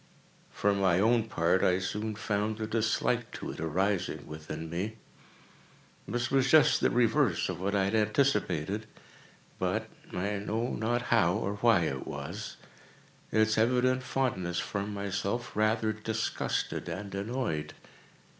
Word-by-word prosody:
For 100 0 +1
my 95 -3 +3
own 115 +2 +3
part, 90 -3 +1
I 90 - +4
soon 105 +3 -3
found 105 0 -1
a 110 - -1
dislike 115 +2 0
to - - -5
it - - -9
arising 90 +4 -1
within 75 +1 -7
me. 95 +7 -3 1.1
This 120 0 -2
was 135 -1 +3
just 150 -2 +6
the - - +4
reverse 120 -2 +2
of - - -4
what 100 +2 0
I 100 - +3
had 100 +2 0
anticipated; 105 - +1 0.7
but—I 100 +2 -3
know 110 +4 -2
not 120 +2 -1
how 95 -6 +4
or 105 -1 -2
why 115 -3 +4
it 70 -5 -2
was—its 110 0 -4
evident 125 +2 +3
fondness 105 -10 -1
for 100 0 -3
myself 100 +3 -3
rather 110 +1 +2
disgusted 110 -4 -2
and 100 +4 -5
annoyed. 100 -6 -3
105 Hz, 130 wpm, -30 LUFS, 95-115 Hz, 1.1 s, just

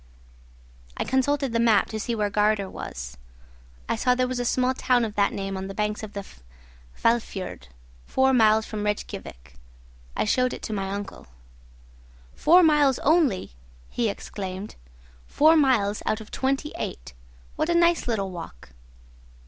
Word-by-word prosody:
I - - 0
consulted 270 0 0
the 230 - +1
map 230 -3 +3
to 220 - -4
see 235 +2 -2
where 210 -2 -1
Gardär 210 -2 +1
was. - - -7 0.7
I - - 0
saw 250 -1 +2
there 255 0 +1
was 255 -1 -3
a 245 - -1
small 255 +2 +1
town 250 -2 +2
of 215 - -5
that 200 -1 +2
name 195 0 -4
on 190 0 -5
the 195 - -8
banks 210 0 -1
of 215 -2 -8
the 200 -1 -6 0.8
Hvalfiord, 225 - -1 0.4
four 265 0 +2
miles 220 -2 +4
from 210 -1 -5
Rejkiavik. 205 - -5 0.6
I - - +1
showed 250 +4 +1
it - - -8
to 220 - -4
my 195 -2 -2
uncle. 200 - -6 1.1
"Four 355 +4 +5
miles 295 -5 +4
only!" 290 - +2 0.4
he 235 -2 0
exclaimed; 195 0 -6 0.5
"four 310 +3 +5
miles 240 -9 +2
out 215 - +1
of 220 - -12
twenty 275 +3 -1
eight. - - -6 0.4
What 315 - -1
a 345 - +2
nice 340 -3 +3
little 200 -5 -1
walk!" 165 - -9
220 Hz, 155 wpm, -25 LUFS, 200-260 Hz, 1.1 s, Four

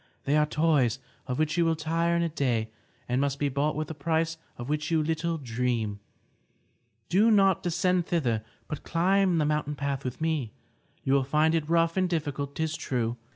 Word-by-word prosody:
They 140 - +1
are 150 0 +3
toys 150 -7 +2 0.3
of 125 - -2
which 155 +2 0
you 170 - +4
will 165 0 +2
tire 165 +2 0
in 170 - +2
a 170 - 0
day 120 -8 -1 0.4
and 125 +2 +1
must 140 -1 0
be 145 0 0
bought 140 +3 0
with 155 0 -2
a - - -4
price 160 +2 -1 0.2
of 120 - -6
which 150 +1 -1
you 160 -2 +2
little 165 +1 -1
dream. 115 -5 -2 1.1
Do 205 +6 +4
not 195 -4 +4
descend 180 0 +1
thither, 120 -11 0 0.2
but 150 - -5
climb 185 +1 +2
the 155 - +2
mountain 150 -1 -1
path 140 -1 -2
with 125 -1 -5
me. 155 -8 -1 0.5
You 135 - +1
will 140 -1 +4
find 155 +4 +2
it 160 -2 0
rough 165 +1 +2
and 185 -1 +2
difficult, 145 -4 -2
'tis 160 0 -1
true. 120 -5 -2
155 Hz, 195 wpm, -28 LUFS, 135-165 Hz, 1.1 s, you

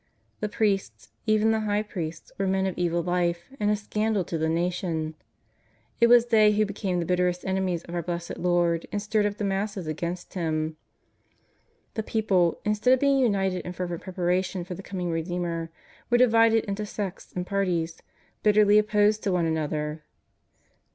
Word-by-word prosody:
The 210 - -2
priests, 205 -3 -1 0.2
even 215 +1 +4
the 220 - +1
High 210 -1 0
Priests, 165 -6 -6
were 195 - +1
men 190 0 +1
of 190 - -2
evil 170 -1 0
life 175 -1 0
and 210 - +1
a 210 - +3
scandal 210 -1 -1
to 165 - -4
the 160 0 +1
nation. 165 -2 -1 0.9
It 235 - +6
was 240 0 +7
they 215 -2 +5
who 215 +1 +2
became 200 -2 -2
the 170 - -1
bitterest 180 0 0
enemies 190 -3 -1
of 170 - -10
our 175 - -1
Blessed 170 0 -5
Lord 175 -1 +1
and 205 - -1
stirred 210 0 +1
up 205 0 -5
the - - -3
masses 195 -1 -2
against 170 +3 -4
Him. 155 -3 -1 1.2
The 220 - -2
people, 195 -6 +1
instead 210 +5 +3
of - - -6
being 275 0 +3
imited 195 -5 +1
in 180 - -6
fervent 175 -2 -4
pre 185 - -8
paration 180 0 0
for 180 - -6
the 180 - -7
coming 180 -3 -4
Redeemer, 165 0 -2 0.4
were 240 - +4
divided 230 -2 +5
into 200 +1 -3
sects 205 -2 -5
and 180 0 -2
parties, 180 -4 -1 0.4
bitterly 210 0 +5
opposed 210 0 +2
to 200 - 0
one 175 -2 +1
another. 155 -1 -2
185 Hz, 175 wpm, -26 LUFS, 170-210 Hz, 1.2 s, was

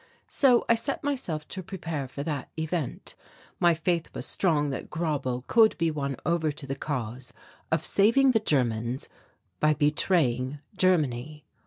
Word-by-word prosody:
So 255 -4 +4
I - - +6
set 230 +5 -2
myself 185 - -3
to 185 - -5
prepare 165 -6 -5
for 140 +2 -6
that 145 -4 -4
event. 160 -3 -3 0.5
My 175 -1 +4
faith 170 +1 -1
was - - -3
strong 150 -6 +1
that 135 - -5
Grauble 145 -7 -2
could 225 -2 +4
be 165 -1 +1
won 140 -3 -3
over 170 -3 +1
to 145 0 -9
the 135 - -3
cause 130 -3 -4 0.4
of 160 -1 +1
saving 235 +7 +4
the 225 - +3
Germans 125 - 0 0.5
by 155 0 +3
betraying 145 -4 +1 0.2
Germany. 150 -6 +1
155 Hz, 150 wpm, -27 LUFS, 135-180 Hz, 0.5 s, I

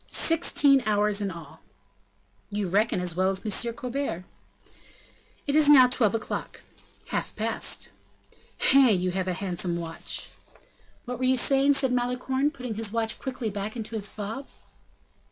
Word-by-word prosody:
"Sixteen 290 -4 +3
hours 210 0 +1
in 200 - -1
all?" 170 -3 -11 0.9
"You 205 -1 -2
reckon 205 +2 +1
as 180 -2 -3
well 185 +1 +2
as 195 +3 -2
M. 230 +3 0
Colbert." 245 -7 -4 1.2
"It 285 - -1
is 305 -1 +5
now 265 -4 +8
twelve 230 -4 +1
o'clock." 220 - -5 0.5
"Half - - -3
past." - - -1 0.8
"Hein! 260 -8 +5
you 180 0 -1
have 185 0 -2
a 185 - 0
handsome 180 -2 -2
watch!" 165 -1 -5 0.8
"What 250 0 -5
were 255 - 0
you 260 0 +3
saying?" 275 +2 +4
said 265 -2 +2
Malicorne, 250 +3 0
putting 250 -7 -6
his 220 -1 -2
watch 225 -1 -1
quickly 255 -5 -4
back 205 +2 -5
into 225 -1 -6
his 205 -2 0
fob. 220 +6 -6
225 Hz, 150 wpm, -26 LUFS, 195-260 Hz, 1.2 s, now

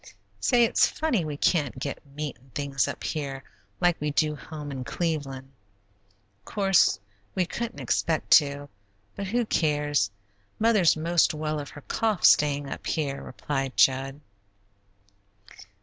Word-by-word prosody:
"Say, 240 - +4
it's 230 - +4
funny 280 - 0
we 150 -2 -4
can't 145 -5 +1
get 140 +2 -5
meat 150 -2 -4
and 130 +1 -24
things 140 -2 0
up - - -6
here 140 -3 -4 0.4
like 175 -3 +2
we 150 - 0
do 150 +1 +1
home 150 0 -8
in 130 -2 -5
Cleveland." 135 -4 -3 0.9
"Course, 195 - +3 0.4
we 185 -2 +2
couldn't 235 +6 -5
expect 160 -1 -1
to, 145 -1 +4 0.5
but 200 - -4
who 235 +4 0
cares? 145 - +1 0.5
Mother's 215 -8 +4
most 165 0 +2
well 155 0 -2
of 145 - -7
her 145 - -11
cough, 215 +3 -1
staying 145 -1 +4
up - - -6
here," 140 -4 -2
replied 135 -2 -4
Jud. 135 +2 +3
150 Hz, 135 wpm, -26 LUFS, 140-175 Hz, 0.9 s, Say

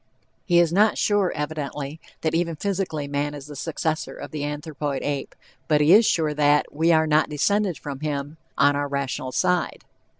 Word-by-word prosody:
He 175 -3 +3
is 170 -1 +4
not 210 +3 +4
sure, 205 -3 +2
evidently, 150 0 -4 0.2
that 160 - 0
even 165 0 0
physically 175 -5 -2
man 145 +1 -2
is 140 -2 -9
the 150 0 -10
successor 160 +2 -3
of 145 - -8
the 150 -2 -4
anthropoid 145 -2 -4
ape, 145 -1 -3 0.3
but 150 -1 +3
he 150 +4 +5
is 220 +2 +7
sure 155 -3 +1
that 150 0 +2
"we 160 +3 +2
are 160 -1 +4
not 155 0 +2
descended 195 +4 +1
from 140 -2 -7
him...on 145 -1 -1
our 145 0 -1
rational 140 -2 -3
side." 180 +6 0
150 Hz, 175 wpm, -24 LUFS, 145-165 Hz, 0.3 s, is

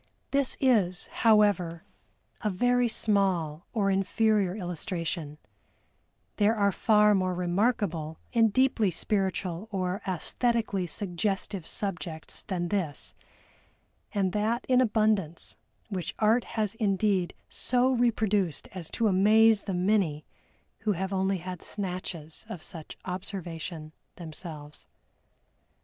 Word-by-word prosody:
This 275 -1 +1
is, 205 -9 +2 0.2
however, 205 -7 +3 0.6
a 215 - 0
very 245 +5 +2
small 185 -8 +1
or 200 -3 +1
inferior 195 0 +2
illustration; 170 -5 -4 1.0
there 210 +2 +3
are 200 -2 +3
far 210 +1 +4
more 185 -2 +1
remarkable 175 -4 0 0.2
and 225 -2 +4
deeply 250 -3 +3
spiritual 190 0 -2
or 185 +1 -2
æsthetically 200 +1 0
suggestive 195 -1 -2
subjects 175 -5 -3
than 175 -3 -3
this, 180 -9 -2 1.0
and 195 -3 +1
that 220 +5 0
in 255 -1 +5
abundance, 215 -8 +1 0.3
which 185 -4 -4
Art 225 +3 +3
has 215 -3 -2
indeed 200 -4 +1
so 255 +1 +2
reproduced 215 - +1
as 180 -4 -7
to 230 - +3
amaze 215 +2 +5
the 195 -3 -2
many 180 -5 +1 0.5
who 215 -1 +1
have 190 +2 -3
only 190 0 +1
had 180 0 -7
snatches 180 -5 -5
of 180 -7 -7
such 160 -3 -8
observation 175 -4 -5 0.2
themselves. 155 -3 -8
195 Hz, 110 wpm, -28 LUFS, 175-215 Hz, 1.0 s, in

